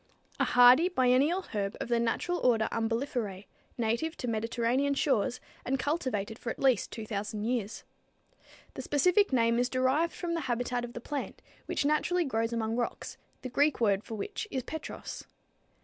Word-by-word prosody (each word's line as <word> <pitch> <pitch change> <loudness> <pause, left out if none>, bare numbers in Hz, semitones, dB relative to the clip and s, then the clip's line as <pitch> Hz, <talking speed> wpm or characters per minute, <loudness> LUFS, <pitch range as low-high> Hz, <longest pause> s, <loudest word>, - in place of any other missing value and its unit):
a - - +3
hardy 250 +8 +7
biennial 285 +4 +3
herb 200 -2 -2
of - - -3
the 235 -1 +1
natural 350 +9 0
order 225 -3 +3
Umbelliferæ, 225 -3 -2 0.3
native 235 +8 -1
to 250 - -4
Mediterranean 235 +5 0
shores, 250 -3 +1 0.2
and 270 +2 0
cultivated 250 -8 -2
for 235 - -5
at - - -4
least 260 -6 +2
2,000 210 -1 -4
years. 230 -2 -2 0.9
The - - -6
specific 360 +7 +3
name 230 -2 +3
is 245 +1 +1
derived 265 +6 +1
from 345 -2 -3
the 335 - -1
habitat 245 0 -1
of 240 0 -7
the 240 - -7
plant, 285 +2 -5 0.2
which - - -1
naturally 335 +4 +2
grows 230 -3 -1
among 225 -1 -1
rocks, 240 - -3 0.3
the 255 - -4
Greek 285 +4 +2
word 205 -3 +2
for 225 - -7
which 420 - -5
is 260 -7 -3
petros. 315 +4 -7
245 Hz, 165 wpm, -30 LUFS, 230-285 Hz, 0.9 s, hardy